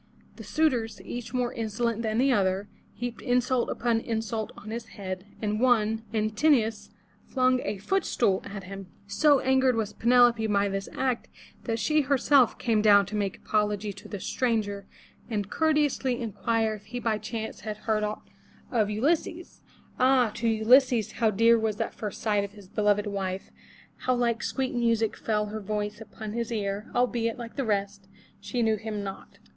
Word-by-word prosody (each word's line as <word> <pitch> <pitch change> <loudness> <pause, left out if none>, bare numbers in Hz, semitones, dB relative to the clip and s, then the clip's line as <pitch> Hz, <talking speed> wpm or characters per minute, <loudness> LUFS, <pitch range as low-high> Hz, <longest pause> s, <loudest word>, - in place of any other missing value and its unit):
The - - -9
suitors, 255 -8 0
each 245 -1 -6
more 250 -1 -1
insolent 230 0 -1
than 220 -1 -1
the 265 +3 +3
other, 195 -3 +1 0.3
heaped 245 +2 -5
insult 250 0 +1
upon 235 -2 +1
insult 225 -1 -3
on 215 - -9
his 230 0 -5
head, 185 -1 -7 0.2
and 210 0 0
one, 225 -3 +3
An 215 -1 0
tin'o 245 +1 +4
us, 215 -2 -7 0.4
flung 255 -1 +2
a 210 - -3
foot 385 - 0
stool 195 -5 +1
at 200 -1 -7
him. 195 0 -8 0.2
So 280 +8 +3
angered 265 -1 +3
was 215 -2 -2
Pe 235 - -6
neFo 245 -1 +7
pe 220 -1 -2
by 200 -1 +2
this 195 0 -3
act 255 -3 -1 0.4
that 225 -2 -1
she 305 +7 +2
herself 275 -2 +3
came 225 -3 +1
down 205 -2 +6
to 215 - -6
make 200 -2 -1
apology 210 -1 -1
to 195 - -12
the 205 - -6
stranger 205 -4 -1 0.4
and 205 -3 -3
courteously 295 -5 +1
inquire 225 0 0
if 205 -1 -10
he 245 +4 -5
by 225 -3 0
chance 220 +1 -5
had 215 -1 -5
heard 215 0 -1
aught 210 0 -4 0.4
of 220 -4 +2
Ulysses. 315 +9 -1 0.4
Ah! 255 -3 +4
to 235 - -2
Ulysses 230 +1 +4
how 225 -2 +1
dear 230 +3 +4
was 220 -1 0
that - - -3
first 210 -3 -6
sight 210 -2 +2
of 200 0 -7
his 205 -3 -14
beloved 205 +1 +1
wife, 195 -2 -4 0.5
how 255 - 0
like 235 -1 0
sweet 265 -1 -2
music 230 -2 +1
fell 210 -1 -1
her 215 +1 -5
voice 210 +1 -3
upon 215 -1 -8
his 235 0 -3
ear, 205 -1 -2
albeit, 240 -2 +1
like 235 -2 -8
the 275 - -1
rest, 200 -2 -2 0.3
she 205 +4 -2
knew 220 -1 +2
him 210 -1 -4
not. 195 -1 -8
220 Hz, 180 wpm, -27 LUFS, 205-245 Hz, 0.5 s, neFo